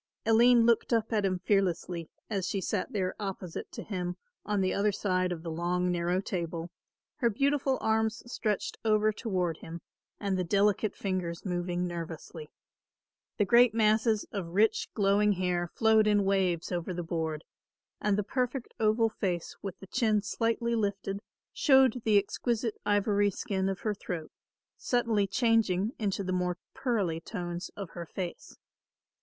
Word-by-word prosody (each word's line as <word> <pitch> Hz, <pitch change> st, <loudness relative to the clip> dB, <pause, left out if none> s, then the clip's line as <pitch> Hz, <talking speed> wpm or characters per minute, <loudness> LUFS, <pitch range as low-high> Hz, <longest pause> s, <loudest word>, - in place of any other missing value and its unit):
Aline 230 Hz, +1 st, +6 dB
looked 235 Hz, +1 st, +3 dB
up 225 Hz, 0 st, +1 dB
at 210 Hz, -2 st, +2 dB
him 185 Hz, -1 st, +1 dB
fearlessly, 180 Hz, -4 st, 0 dB, 0.2 s
as 195 Hz, -4 st, -2 dB
she 200 Hz, -, -1 dB
sat 190 Hz, 0 st, -2 dB
there 185 Hz, -3 st, -1 dB
opposite 190 Hz, -4 st, -5 dB
to -, -, -6 dB
him 180 Hz, -3 st, -3 dB, 0.3 s
on 205 Hz, 0 st, 0 dB
the 185 Hz, -, +1 dB
other 205 Hz, +1 st, +2 dB
side 185 Hz, -2 st, 0 dB
of 165 Hz, -2 st, -4 dB
the 165 Hz, -, -4 dB
long 180 Hz, +2 st, 0 dB
narrow 175 Hz, +1 st, 0 dB
table, 170 Hz, -3 st, -4 dB, 0.5 s
her 240 Hz, -4 st, +2 dB
beautiful 275 Hz, +3 st, +1 dB
arms 220 Hz, 0 st, +1 dB
stretched 215 Hz, -4 st, -2 dB
over 215 Hz, -1 st, +3 dB
toward 185 Hz, -8 st, -1 dB
him 165 Hz, +1 st, -8 dB, 0.4 s
and 195 Hz, -2 st, -1 dB
the -, -, +1 dB
delicate 205 Hz, +3 st, +2 dB
fingers 185 Hz, -3 st, -3 dB
moving 175 Hz, -1 st, -1 dB
nervously. 165 Hz, -2 st, -6 dB, 0.9 s
The 205 Hz, -, +3 dB
great 235 Hz, +1 st, +5 dB
masses 220 Hz, 0 st, +3 dB
of 180 Hz, -4 st, -5 dB
rich 215 Hz, +2 st, +3 dB
glowing 205 Hz, 0 st, +3 dB
hair 180 Hz, -2 st, 0 dB
flowed 220 Hz, +3 st, +3 dB
in 205 Hz, -1 st, +3 dB
waves 190 Hz, -4 st, +1 dB
over 175 Hz, 0 st, -2 dB
the 175 Hz, -, -3 dB
board, 160 Hz, -2 st, -3 dB, 0.6 s
and 210 Hz, -1 st, +1 dB
the 210 Hz, -, +1 dB
perfect 250 Hz, +3 st, -2 dB
oval 220 Hz, +1 st, +3 dB
face 180 Hz, -5 st, -3 dB
with 195 Hz, -3 st, -6 dB
the -, -, -10 dB
chin 215 Hz, 0 st, +1 dB
slightly 230 Hz, +2 st, 0 dB
lifted 200 Hz, -3 st, -1 dB, 0.3 s
showed 265 Hz, -4 st, +4 dB
the 215 Hz, -2 st, +5 dB
exquisite 225 Hz, +3 st, 0 dB
ivory 205 Hz, 0 st, +3 dB
skin 190 Hz, 0 st, -2 dB
of 195 Hz, -, -4 dB
her 215 Hz, -, 0 dB
throat, 175 Hz, -5 st, -6 dB, 0.5 s
subtly 225 Hz, -5 st, +1 dB
changing 220 Hz, -2 st, +2 dB
into 200 Hz, -2 st, -1 dB
the 185 Hz, 0 st, -2 dB
more 180 Hz, -1 st, 0 dB, 0.2 s
pearly 200 Hz, -11 st, 0 dB
tones 175 Hz, -1 st, -5 dB
of 195 Hz, -4 st, -6 dB
her 170 Hz, -1 st, -7 dB
face. 180 Hz, 0 st, -6 dB
200 Hz, 155 wpm, -30 LUFS, 180-220 Hz, 0.9 s, Aline